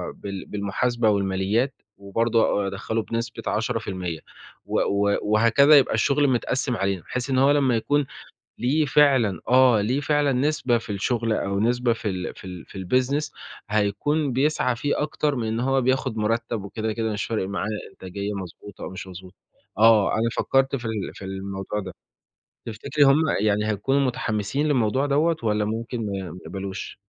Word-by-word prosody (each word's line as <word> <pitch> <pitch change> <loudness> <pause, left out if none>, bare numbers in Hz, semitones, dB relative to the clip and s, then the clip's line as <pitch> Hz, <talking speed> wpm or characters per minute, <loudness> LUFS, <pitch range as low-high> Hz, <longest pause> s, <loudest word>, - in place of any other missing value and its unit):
بال 100 -2 -7
بالمحاسبة 110 +3 0
والماليات، 100 +6 +1 0.2
وبرضه 110 +1 +1
أ - - -1
أدخلّه 105 +3 -2
بنسبة 115 +1 -4
10% 95 -7 -2 0.5
و - - 0
و 100 0 +1
وهكذا 115 +8 +5
يبقى 140 - +3
الشغل 145 +1 +2
متقسِّم 125 +1 0
علينا، 95 -2 -1
بحيث 125 +1 -4
إن 130 - +1
هو 135 +2 +5
لمّا 135 -4 +3
يكون 145 +5 +1 0.5
ليه 145 +5 +2
فعلًا 130 - +3
آه 125 -4 +5
ليه 125 +7 0
فعلًا 145 -1 +2
نسبة 130 -2 +1
في 115 - -9
الشغل 115 +3 0
أو 100 -2 -1
نسبة 120 +1 +2
في 110 -2 -4
ال 90 -1 -4
في - - -13
ال 90 -2 -8
في 95 - -8
الBusiness 135 +7 +1 0.4
هيكون 110 +8 0
بيسعى 135 -1 +1
فيه 145 +5 -1
أكتر 150 -1 -1
من 115 -3 -2
إن 110 +1 -1
هو 135 +1 +1
بياخد 130 -2 0
مرتب 110 0 -1
وكده، 110 +2 -3
كده 110 -1 -2
مش 105 - -2
فارق 110 -5 -2
معاه 100 +1 -2 0.2
إنتاجية 100 +3 -5
مضبوطة 95 +1 -8
أو - - -5
مش 95 +1 -8
مضبوطة، 95 +1 -11 0.4
آه، 110 -2 +5
أنا 115 +1 +1
فكّرت 135 +1 +2
في 125 -3 -6
ال 115 - -1 0.2
في 95 - -10
الموضوع 95 +1 -4
ده، - - -7 0.7
تفتكري 115 +6 0
هم 140 +3 +5 0.2
يعني 105 0 +1
هيكونوا 120 +7 +1
متحمّسين 120 +1 -1
للموضوع 130 0 +1
دوَّة 155 +4 +2
والّا 105 -1 +1
ممكن 115 +3 -3
ما 95 -3 -4
ما 90 - -9
يقبلوش؟ 95 -1 -6
115 Hz, 165 wpm, -24 LUFS, 100-130 Hz, 0.7 s, وهكذا